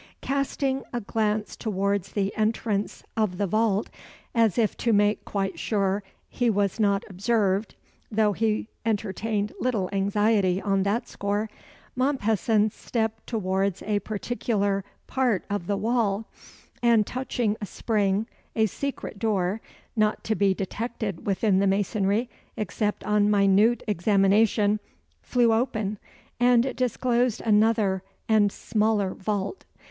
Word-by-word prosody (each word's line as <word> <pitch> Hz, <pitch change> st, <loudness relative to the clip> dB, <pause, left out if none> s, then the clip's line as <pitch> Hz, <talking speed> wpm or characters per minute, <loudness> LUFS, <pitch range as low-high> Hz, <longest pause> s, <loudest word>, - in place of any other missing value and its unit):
Casting 275 Hz, 0 st, -1 dB
a 240 Hz, -, -2 dB
glance 215 Hz, -1 st, -1 dB
towards 200 Hz, -2 st, -1 dB
the 200 Hz, -1 st, -1 dB
entrance 215 Hz, -1 st, -1 dB
of 215 Hz, -5 st, 0 dB
the 205 Hz, -, +1 dB
vault 215 Hz, +1 st, +1 dB, 0.4 s
as 225 Hz, -5 st, +3 dB
if 220 Hz, -3 st, +2 dB
to 235 Hz, -, +1 dB
make 205 Hz, 0 st, +3 dB
quite 195 Hz, -4 st, -2 dB
sure 200 Hz, -2 st, 0 dB, 0.3 s
he 245 Hz, -1 st, 0 dB
was 205 Hz, 0 st, 0 dB
not 200 Hz, -2 st, +2 dB
observed 200 Hz, 0 st, 0 dB, 0.3 s
though 215 Hz, -1 st, +2 dB
he 215 Hz, +1 st, 0 dB, 0.2 s
entertained 210 Hz, -1 st, -1 dB
little 220 Hz, -8 st, 0 dB
anxiety 200 Hz, -1 st, +2 dB
on 195 Hz, -1 st, +1 dB
that 200 Hz, +5 st, 0 dB
score 205 Hz, +2 st, -2 dB, 0.4 s
Mompesson 225 Hz, -5 st, +2 dB
stepped 220 Hz, -1 st, -3 dB
towards 195 Hz, -3 st, -1 dB
a 205 Hz, 0 st, 0 dB
particular 205 Hz, -2 st, -1 dB, 0.2 s
part 250 Hz, -8 st, 0 dB
of 200 Hz, -4 st, -2 dB
the 200 Hz, -, 0 dB
wall, 225 Hz, -2 st, 0 dB, 0.6 s
and 230 Hz, -3 st, +4 dB
touching 245 Hz, -3 st, -1 dB
a 205 Hz, -, -4 dB
spring, 205 Hz, -1 st, 0 dB, 0.3 s
a 220 Hz, -, +4 dB
secret 265 Hz, -1 st, -4 dB
door 205 Hz, -1 st, 0 dB, 0.3 s
(not 215 Hz, -1 st, +1 dB
to 220 Hz, -, 0 dB
be 200 Hz, -2 st, +3 dB
detected 210 Hz, -1 st, -4 dB
within 195 Hz, 0 st, +2 dB
the 200 Hz, -, +3 dB
masonry 200 Hz, +3 st, +1 dB, 0.3 s
except 210 Hz, +1 st, -2 dB
on 210 Hz, 0 st, +2 dB
minute 205 Hz, +3 st, +4 dB
examination) 205 Hz, +2 st, +3 dB, 0.4 s
flew 240 Hz, -2 st, +3 dB
open, 220 Hz, -3 st, -1 dB, 0.4 s
and 245 Hz, +1 st, +4 dB
disclosed 245 Hz, -1 st, +1 dB
another 215 Hz, -3 st, +3 dB, 0.3 s
and 210 Hz, -2 st, +4 dB
smaller 210 Hz, -3 st, 0 dB
vault. 205 Hz, -, -3 dB
210 Hz, 125 wpm, -26 LUFS, 200-225 Hz, 0.6 s, and